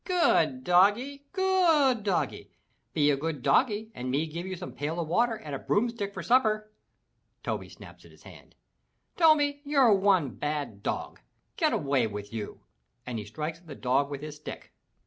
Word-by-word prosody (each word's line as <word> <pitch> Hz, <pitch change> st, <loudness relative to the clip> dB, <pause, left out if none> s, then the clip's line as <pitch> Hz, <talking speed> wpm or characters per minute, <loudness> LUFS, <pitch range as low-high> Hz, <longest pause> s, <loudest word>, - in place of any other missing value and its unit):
"Good 335 Hz, -7 st, +2 dB
doggie! 225 Hz, +11 st, +3 dB
Good 345 Hz, -, +3 dB
doggie. 175 Hz, -9 st, -1 dB, 0.4 s
Be 145 Hz, -1 st, +3 dB
a -, -, +2 dB
good 150 Hz, -2 st, -4 dB
doggie 220 Hz, -3 st, +2 dB
and 125 Hz, +1 st, -5 dB
me 140 Hz, +5 st, +1 dB
give 170 Hz, +3 st, -6 dB
you 190 Hz, -, -4 dB
some 180 Hz, 0 st, -7 dB
pail 155 Hz, +4 st, -3 dB
of 165 Hz, -, -2 dB
water 230 Hz, +7 st, +2 dB
and 155 Hz, -9 st, -8 dB
a 135 Hz, -, -3 dB
broomstick 215 Hz, -2 st, -1 dB
for -, -, -7 dB
supper!" 215 Hz, -4 st, +2 dB, 0.7 s
Toby -, -, -3 dB
snaps -, -, -14 dB
at -, -, -16 dB
his -, -, -20 dB
hand. -, -, -15 dB, 0.6 s
"Toby, 290 Hz, -4 st, +4 dB
you're 275 Hz, -6 st, +4 dB
one 190 Hz, -8 st, +3 dB
bad 145 Hz, -4 st, -4 dB
dog! -, -, -4 dB, 0.4 s
Get -, -, +2 dB
away 135 Hz, -5 st, +1 dB
with 105 Hz, 0 st, -7 dB
you!" 110 Hz, -2 st, -6 dB, 0.4 s
and 120 Hz, -3 st, -4 dB
he 105 Hz, -, -7 dB
strikes 155 Hz, +9 st, -5 dB
at 175 Hz, -, -23 dB
the 145 Hz, -, -8 dB
dog 135 Hz, +3 st, +1 dB
with 140 Hz, -1 st, -6 dB
his 150 Hz, -1 st, -7 dB
stick. 150 Hz, -, -9 dB
180 Hz, 175 wpm, -28 LUFS, -, 0.7 s, Toby